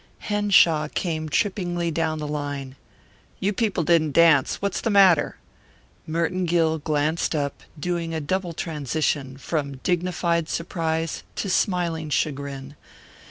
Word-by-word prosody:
Henshaw 195 -7 +3
came 155 -1 -3
trippingly 175 -2 0
down 160 0 -1
the 150 -1 -4
line. 145 -3 -4 0.6
"You 200 +2 0
people 205 -5 0
didn't 160 -3 +3
dance. 165 -5 +4
What's 200 -1 -2
the 230 - 0
matter?" 195 -5 +5 0.7
Merton 170 +3 0
Gill 160 -2 +2
glanced 155 +2 0
up, 140 -2 -2 0.2
doing 170 0 -2
a 160 - -2
double 180 +3 -2
transition, 150 -4 -2
from 140 -2 -3
dignified 170 -2 0
surprise 165 -1 -2
to 195 - -2
smiling 170 -5 0
chagrin. 140 -2 -2
165 Hz, 120 wpm, -24 LUFS, 150-175 Hz, 0.7 s, matter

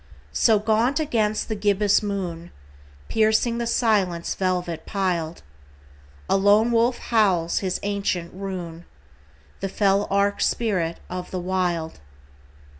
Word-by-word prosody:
So 220 -2 +4
gaunt 225 +7 +1
against 220 -8 0
the 220 - -2
gibbous 205 0 +2
moon, 180 -5 -4 0.6
Piercing 220 +2 +2
the 235 - -2
silence 200 -8 +1
velvet 180 -3 -2
piled, 175 -5 -2 0.8
A - - +2
lone 205 +4 +4
wolf 235 +2 +2
howls 190 -7 +1
his 185 -2 -2
ancient 200 -4 -2
rune— 180 -3 -6 0.7
The 195 - -3
fell 200 +1 +2
arch 200 +1 +1
spirit 185 -8 0
of 180 0 -6
the 185 - -4
Wild. 175 - -2
195 Hz, 115 wpm, -23 LUFS, 180-215 Hz, 0.8 s, So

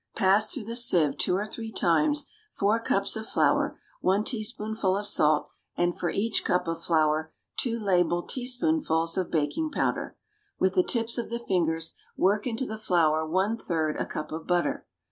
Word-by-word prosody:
= - - -40
Pass 195 +3 +3
through 265 - -2
the 230 +2 -5
sieve 170 - +3
two 180 - +2
or 200 +2 -1
three 225 +1 -7
times 295 - +2 0.3
four 210 +3 +2
cups 200 -3 0
of 220 0 -5
flour, - - +1 0.2
one 195 +3 +2
teaspoonful 215 -3 -1
of 205 - -3
salt, 150 -4 +2 0.3
and, 175 0 +1
for 175 - -2
each 220 +2 0
cup 180 - +1
of 165 0 -3
flour, 155 -1 +1 0.2
two 235 -2 0
level 175 -4 +2
teaspoonfuls 250 - 0
of 185 -2 -1
baking 170 - 0
powder. 290 - -2 0.4
With 190 0 +2
the 185 - +4
tips 230 +4 0
of 235 - -4
the 235 - -2
fingers 165 -7 0 0.2
work 205 +4 +2
into 245 +2 -2
the 220 -3 -6
flour 165 -7 +2
one 190 +7 +1
third 155 -3 -1
a - - -2
cup 155 - -5
of 160 +1 -6
butter. 175 -1 0
195 Hz, 180 wpm, -27 LUFS, 165-225 Hz, 0.4 s, the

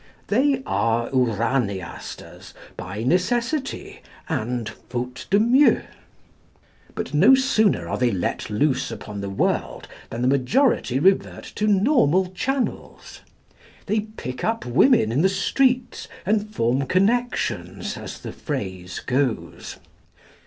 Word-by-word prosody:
They 265 +4 +2
are 115 +1 0
Uraniasters 115 -6 -2 0.2
by 100 +4 -6
necessity 245 - -1 0.3
and 120 -6 -2 0.2
faute 125 +1 -5
de 200 - +4
mieux. 250 +6 +4 1.1
But - - -5
no 195 - +7
sooner 260 -6 +2
are - - -3
they 125 -1 +3
let 95 -1 -2
loose 130 +4 0
upon 105 -1 -7
the 100 - -4
world 95 - -1 0.2
than 120 +2 -4
the - - +2
majority 140 - +2
revert 190 +7 +2
to 215 - -1
normal 190 - +3
channels. 265 +7 -4 0.6
They 215 +2 +1
pick 210 - -7
up 225 +1 -1
women 125 - +4
in 130 +6 +1
the 190 - +4
streets, 250 +6 0 0.2
and 210 +1 +1
form 130 - 0
connections, 240 - 0
as - - -7
the - - -8
phrase 95 - -5
goes. 125 - -2
165 Hz, 115 wpm, -23 LUFS, -, 1.1 s, no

